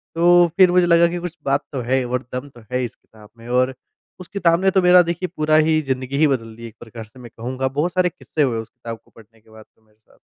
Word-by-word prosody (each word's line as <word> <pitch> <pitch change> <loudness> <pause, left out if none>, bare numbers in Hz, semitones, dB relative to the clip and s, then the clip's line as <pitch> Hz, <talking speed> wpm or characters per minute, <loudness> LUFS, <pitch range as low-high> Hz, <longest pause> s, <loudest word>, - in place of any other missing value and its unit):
तो 175 +1 +5
फिर 185 -2 +6
मुझे 180 0 +4
लगा 170 0 +5
कि 175 +1 -4
कुछ 175 -1 -7
बात 140 +1 +1
तो 135 -3 -4
है 130 -1 +2
और 125 +1 -3
दम 130 +3 -5
तो 120 -3 -17
है 125 0 -1
इस 120 - -9
किताब 105 -1 -20
में 115 - -14
और 130 +1 +1 0.5
उस 185 - -10
किताब 175 -3 +1
ने 190 - +4
तो 190 -1 +2
मेरा 180 0 +6
देखिए 175 +1 -3
पूरा 155 0 +2
ही 155 0 +3
ज़िंदगी 130 -1 -3
ही 155 +1 +4
बदल 115 -5 -3
दी 115 0 -9
एक 110 - -15
प्रकार 115 -1 -10
से 115 +4 -19
मैं 120 -2 -12
कहूँगा। 130 +3 -3
बहुत 150 +6 -2
सारे 185 -1 +2
किस्से 160 - -5
हुए 120 -4 0
उस 110 - -8
किताब 115 0 -9
को - - -28
पढ़ने 110 0 -20
के 110 - -26
बाद 110 0 -15
तो - - -35
मेरे 105 0 -33
साथ। - - -28
135 Hz, 275 wpm, -20 LUFS, 115-170 Hz, 0.5 s, फिर